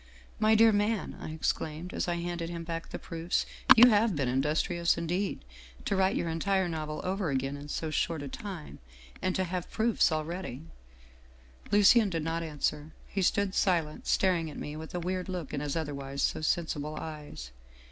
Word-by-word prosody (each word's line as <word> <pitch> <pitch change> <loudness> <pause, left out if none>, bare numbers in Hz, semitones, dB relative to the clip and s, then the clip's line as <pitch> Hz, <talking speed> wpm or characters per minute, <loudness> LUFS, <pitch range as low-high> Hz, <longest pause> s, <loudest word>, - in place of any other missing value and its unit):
" 65 -1 -23
' - - -25
My 220 - +6
dear 225 +1 +7
man/ 210 +1 0
I - - -5
exclaimed, 160 +2 -2
as - - -1
I 175 - 0
handed 170 -1 -3
him 170 -1 -5
back 165 0 -5
the - - -5
proofs. 165 +1 -2 0.2
' - - +8
You 245 +2 +10
have 210 -2 +3
been 140 -3 0
industrious 155 +7 +1
indeed, 175 - -2 0.4
to - - +1
write 190 +1 +3
your - - -1
entire 190 +3 +1
novel 155 -2 -4
over 190 -2 -1
again 135 +1 -1
in 145 +1 -8
so 155 +1 -3
short 160 0 0
a - - -5
time 190 - -7 0.4
and 185 0 0
to 190 - +1
have 180 -1 -4
proofs 225 -4 +2
already 155 -2 -3 0.4
' 65 0 -25
" 65 - -22
Lucien 210 +1 +6
did 165 -3 -2
not 165 +1 -1
answer. 150 -1 -2
He 195 - -3
stood 195 +1 +2
silent, 165 -6 0
staring 175 -4 +2
at - - -9
me 150 - -5
with 160 +2 -7
a - - 0
weird 185 +2 -3
look 180 -6 -4
in 145 - -1
his 145 -1 -2
otherwise 140 -3 -3
so - - 0
sensible 155 -2 -1
eyes. 150 - -7
165 Hz, 200 wpm, -30 LUFS, 150-185 Hz, 0.4 s, You